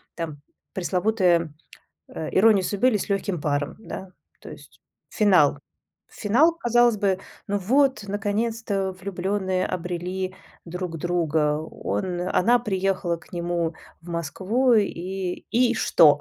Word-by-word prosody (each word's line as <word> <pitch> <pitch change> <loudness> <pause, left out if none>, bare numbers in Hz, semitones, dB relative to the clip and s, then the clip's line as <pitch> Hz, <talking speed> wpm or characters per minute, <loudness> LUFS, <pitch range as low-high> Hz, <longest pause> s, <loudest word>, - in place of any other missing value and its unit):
там, 155 -4 -5 0.3
пресловутая, 180 -3 +1 0.5
э, 160 - -6
"Ирония 205 -1 +5
судьбы, 205 +6 +1
или 220 - +1
С 205 - -5
лёгким 195 -4 -1
паром!", 145 -1 -1
да. 190 -4 -8 0.3
То - - -11
есть - - -14 0.3
финал. 180 -9 +4 0.5
Финал, 250 +11 +3
казалось 240 -5 +3
бы: 195 -2 +1 0.3
ну 205 0 0
вот, 260 +5 +2
наконец-то, 205 -1 -1
влюблённые 190 0 -2
обрели 180 +1 -3 0.3
друг 180 -1 -5
друга. 160 -3 +1
Он 160 - -3
она 220 +6 +3
приехала 190 -5 -1
к 165 - -20
нему 170 -1 -1 0.3
в 170 - -12
Москву, 190 - +1
и 190 -3 -1
и 240 +1 +3
что? 160 -9 +5
190 Hz, 120 wpm, -24 LUFS, 170-210 Hz, 0.5 s, Ирония